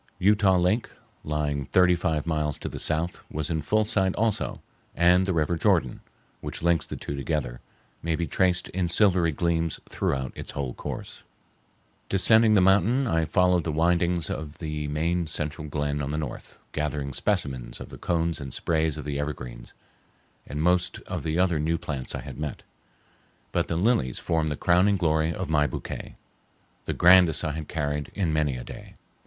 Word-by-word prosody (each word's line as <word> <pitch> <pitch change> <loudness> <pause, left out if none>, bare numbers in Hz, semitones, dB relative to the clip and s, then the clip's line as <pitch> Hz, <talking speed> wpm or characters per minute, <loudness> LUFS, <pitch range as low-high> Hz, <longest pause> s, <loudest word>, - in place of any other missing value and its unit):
Utah 100 -1 +4
Lake, 90 +7 +1 0.3
lying 75 -2 -1
thirty 90 -1 +4
five 80 -3 -1
miles 75 -3 -1
to - - -6
the - - -6
south, 85 +3 0
was 75 +1 -3
in 80 -1 0
full 110 +8 +2
sight 95 -4 +1
also, 110 -1 -1 0.4
and 90 +2 +4
the - - +1
river 80 0 +1
Jordan, - - +2 0.4
which - - -6
links 85 -3 +2
the - - -5
two 70 - -5
together, 70 -4 -2 0.4
may 80 0 0
be 85 - -1
traced 90 +3 +1
in 90 -1 -1
silvery 90 -3 +3
gleams 85 +1 0
throughout 65 -2 -2
its - - -6
whole 65 -3 -3
course. - - -7 0.9
Descending 110 +3 +5
the 100 - +6
mountain, 105 +8 +4
I 80 -8 +1
followed 90 +1 +3
the 80 - -2
windings 85 +1 +1
of 75 0 -5
the 75 -2 -4
main 85 +3 0
central 75 0 -4
glen 75 0 -2
on 70 - -3
the 75 - -2
north, 75 -5 -6
gathering 75 -2 -2
specimens 65 - -2
of - - -8
the - - -11
cones 85 -2 -1
and 70 -2 -6
sprays 80 0 0
of 75 - -6
the 70 -1 -3
evergreens, 60 -5 -6 0.7
and 75 +2 -3
most 90 +1 +2
of - - -5
the 80 +1 -2
other 90 -3 +2
new 80 +2 0
plants 70 -5 -4
I - - -4
had 70 -2 -9
met; 75 -3 -5 0.9
but - - 0
the 80 - -1
lilies 90 - +1
formed 80 -1 0
the 75 - -2
crowning 95 +3 +3
glory 80 -2 +1
of 95 - -4
my 75 -2 +2
bouquet—the - - -9
grandest 90 -3 +5
I 75 - 0
had 75 0 -5
carried 75 -2 -2
in 90 -6 0
many 75 -4 +1
a - - -6
day. - - -11
80 Hz, 175 wpm, -26 LUFS, 75-90 Hz, 0.9 s, the